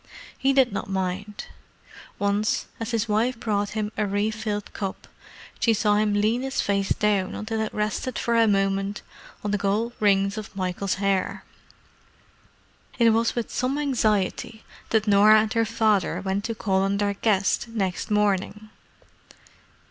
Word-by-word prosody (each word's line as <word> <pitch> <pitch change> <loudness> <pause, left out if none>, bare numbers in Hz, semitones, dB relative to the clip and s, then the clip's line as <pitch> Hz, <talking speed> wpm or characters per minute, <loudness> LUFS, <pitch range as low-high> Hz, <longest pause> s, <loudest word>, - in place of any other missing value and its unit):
He 270 - +1
did 265 -5 +3
not 200 - -4
mind. 190 +2 -3 0.7
Once, 205 +1 0
as 225 - -4
his 230 -1 -1
wife 225 +3 0
brought 205 -3 -1
him 210 -1 -2
a 210 - 0
refilled 210 +1 -2
cup, 195 -2 -5 0.5
she 230 -2 +3
saw 210 0 +2
him 210 -1 +1
lean 215 +4 +1
his 270 0 -3
face 200 -1 0
down 205 -3 +1
until 220 +1 -3
it 220 - -2
rested 215 +3 -2
for 235 - 0
a 230 -1 +5
moment 195 0 0 0.4
on 205 - -2
the 205 - 0
gold 210 +4 0
rings 200 0 +2
of 210 - -10
Michael's 185 +1 -2
hair. 195 -1 -1 1.5
It 235 -2 +5
was 230 +1 +1
with 235 -3 -3
some 255 +3 -1
anxiety 220 -6 0 0.3
that 220 -1 +2
Norah 210 +2 +6
and 220 +1 -2
her 230 -1 +2
father 215 -3 +1
went 195 +2 -2
to 230 -1 -3
call 190 -3 0
on 195 +1 0
their 200 0 0
guest 200 +1 +1
next 195 -6 -3
morning. 210 +1 0
210 Hz, 155 wpm, -25 LUFS, 200-225 Hz, 1.5 s, Norah